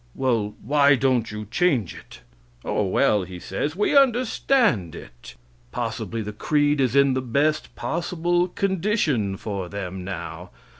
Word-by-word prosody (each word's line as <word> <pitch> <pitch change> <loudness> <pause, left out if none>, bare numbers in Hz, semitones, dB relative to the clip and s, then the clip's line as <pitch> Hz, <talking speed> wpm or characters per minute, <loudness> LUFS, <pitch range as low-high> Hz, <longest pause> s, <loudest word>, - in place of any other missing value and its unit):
"Well, 115 -5 0
why 145 +2 +4
don't 125 -4 +1
you 105 0 -6
change 140 - +1
it?" - - -14 0.4
"Oh, 105 - 0
well," 100 +2 +2
he 90 0 -8
says, 150 - -3
"we 210 +8 +1
understand 240 - +2
it." - - -12 0.4
Possibly 115 -1 -3
the 105 0 -6
creed 145 +5 +1
is 130 -1 +1
in 140 -1 +5
the 130 - -1
best 145 +5 0
possible 175 +1 -1
condition 175 - 0
for 100 -4 -5
them 95 -2 -6
now. 90 -3 -7
130 Hz, 140 wpm, -23 LUFS, 105-170 Hz, 0.4 s, in